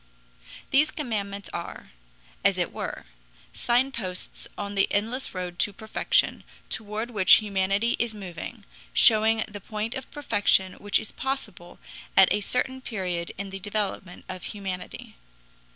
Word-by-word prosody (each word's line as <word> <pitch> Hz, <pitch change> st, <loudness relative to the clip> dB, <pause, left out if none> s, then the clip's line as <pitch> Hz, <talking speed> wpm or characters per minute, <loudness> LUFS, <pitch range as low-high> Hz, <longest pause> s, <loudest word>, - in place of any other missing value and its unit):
These 300 Hz, +3 st, +5 dB
commandments 200 Hz, -8 st, -3 dB
are, 170 Hz, 0 st, -6 dB, 0.5 s
as -, -, +4 dB
it -, -, -1 dB
were, -, -, -5 dB, 0.5 s
signposts 240 Hz, -7 st, -1 dB
on 200 Hz, 0 st, -4 dB
the 195 Hz, -1 st, +2 dB
endless 225 Hz, +4 st, -1 dB
road 180 Hz, -1 st, -4 dB
to 205 Hz, -, +1 dB
perfection, 220 Hz, +2 st, +1 dB, 0.3 s
toward 220 Hz, +2 st, -2 dB
which 195 Hz, -5 st, +6 dB
humanity 200 Hz, +2 st, +3 dB
is 230 Hz, -1 st, -1 dB
moving, 200 Hz, +3 st, -7 dB, 0.3 s
showing 220 Hz, 0 st, +6 dB
the 205 Hz, -1 st, -8 dB
point 215 Hz, +3 st, -3 dB
of 265 Hz, -1 st, -6 dB
perfection 205 Hz, -9 st, +2 dB
which 205 Hz, 0 st, +2 dB
is 220 Hz, -, -4 dB
possible 225 Hz, -10 st, -4 dB, 0.4 s
at 190 Hz, -1 st, +8 dB
a 210 Hz, -, 0 dB
certain 260 Hz, +5 st, -1 dB
period 185 Hz, -8 st, -3 dB
in 195 Hz, 0 st, -5 dB
the 195 Hz, -, -5 dB
development 200 Hz, -2 st, -3 dB
of 185 Hz, -1 st, -6 dB
humanity. 190 Hz, -, -6 dB
205 Hz, 135 wpm, -26 LUFS, 190-230 Hz, 0.5 s, at